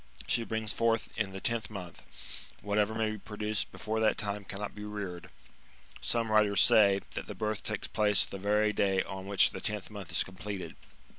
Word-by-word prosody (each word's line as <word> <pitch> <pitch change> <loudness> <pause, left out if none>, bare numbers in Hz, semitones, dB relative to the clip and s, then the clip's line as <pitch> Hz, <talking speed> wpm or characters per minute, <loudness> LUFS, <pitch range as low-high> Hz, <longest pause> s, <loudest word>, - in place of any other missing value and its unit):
She 120 -2 +1
brings 110 -1 0
forth 115 -1 +1
in 105 -3 -1
the 95 - -6
tenth 115 +2 -1
month; 90 -5 -8 0.6
whatever 105 +1 +1
may 110 -1 +1
be 110 - -5
produced 105 0 -2
before 110 0 -3
that 110 -1 +3
time 100 -1 -2
cannot 100 +2 -5
be 105 - -8
reared. 100 -5 -5 0.7
Some 115 -2 0
writers 105 -2 +5
say, 100 -2 +6
that - - -5
the - - -6
birth 110 -1 -2
takes - - -3
place 105 -2 +3
the 100 - -7
veiy 105 +2 +2
day 95 -1 +2
on 95 0 -7
which 100 -1 +5
the - - -6
tenth 105 -1 -3
month 100 -4 -8
is - - +2
completed. 95 -2 -6
105 Hz, 190 wpm, -31 LUFS, 100-110 Hz, 0.7 s, say